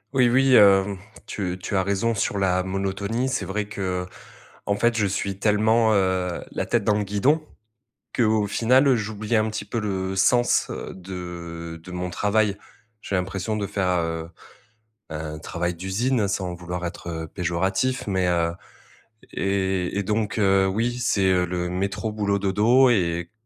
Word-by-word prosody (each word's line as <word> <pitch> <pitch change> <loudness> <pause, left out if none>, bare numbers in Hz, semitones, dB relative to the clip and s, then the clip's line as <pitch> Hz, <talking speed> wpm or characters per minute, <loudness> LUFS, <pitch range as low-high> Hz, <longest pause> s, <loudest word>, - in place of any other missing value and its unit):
Oui, 125 -2 +5
oui, 130 +2 +4
hem, 100 -3 +6 0.3
tu 90 -3 -3
tu 95 +2 -4
as 95 - +3
raison 100 +4 0
sur 100 -1 -1
la 95 -1 +2
monotonie, 100 +5 -2
c'est 130 - -1
vrai 105 +2 -2
que, 95 -3 -3 0.6
en 100 - +1
fait 120 +3 +2
je 105 - +2
suis 100 0 -2
tellement, 110 +2 +3
heu, 95 -3 0
la - - -3
tête 120 -3 +1
dans 105 0 +2
le 105 - 0
guidon, 130 +11 +1 0.7
que, 120 - +2
au 110 -1 +2
final, 125 +6 +3
heu, 130 - +5
j'oublie 110 0 -2
un 110 0 +3
petit 110 - -4
peu 115 - -3
le 95 -2 -2
sens 120 +6 +3
heu - - -6
de 85 -3 -7
de 90 - -10
mon 90 0 -3
travail. 105 +2 +1 0.5
J'ai - - -6
l'impression 95 +3 -2
de 100 -2 -2
faire, 90 -3 0
heu, 80 -1 -3 0.8
un 75 0 -5
travail 85 +2 -3
d'usine 100 +5 0
sans 95 -2 -2
vouloir 90 0 -5
être, 85 - -7 0.2
heu, - - -12
péjoratif, 95 - -1
mais, 95 -2 +1
heu, 85 -1 +1 0.8
et 95 -1 -1
et 100 - 0
donc, 105 +2 -1
heu, 95 -2 +3
oui, 115 +5 -1
c'est, 100 -5 +2
heu, 90 -1 +2
le 90 0 -3
métro 100 +4 -2
boulot 100 -2 0
dodo 110 +7 +4
et 85 -6 0
100 Hz, 170 wpm, -24 LUFS, 90-110 Hz, 0.8 s, hem